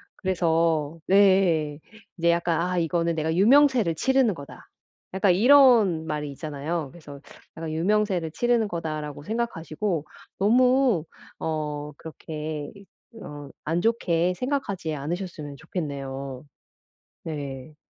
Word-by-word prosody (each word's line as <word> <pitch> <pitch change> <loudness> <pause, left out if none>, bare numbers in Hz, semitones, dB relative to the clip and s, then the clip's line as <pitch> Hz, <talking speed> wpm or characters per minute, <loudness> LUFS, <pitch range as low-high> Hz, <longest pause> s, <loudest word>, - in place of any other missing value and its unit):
그래서 165 -4 0
네 195 - +2
예. 170 -7 +3 0.4
이제 170 0 +3
약간 170 -1 +1
아 180 +1 0
이거는 170 0 0
'내가 160 +1 -1
유명세를 245 - +5
치르는 260 +3 +2
거다.' 140 -4 -12 0.5
약간 190 -1 +3
이런 225 - +5
말이 150 -1 -3
있잖아요. 150 +1 -4
그래서 145 -4 -12 0.3
약간 160 -1 -5
'유명세를 180 -1 0
치르는 235 +3 +1
거다.'라고 155 -4 -5
생각하시고 195 -6 -2 0.4
너무 250 - +3 0.3
어 150 -2 -3
그렇게 155 -2 -6
이 200 0 -14 0.4
어 145 -1 -9
안 165 +3 0
좋게 180 -6 +1
생각하지 205 - -2
않으셨으면 155 -1 -5
좋겠네요. 135 -5 -5 0.8
네. 145 -2 -6
165 Hz, 270 characters per minute, -25 LUFS, 150-200 Hz, 0.8 s, 유명세를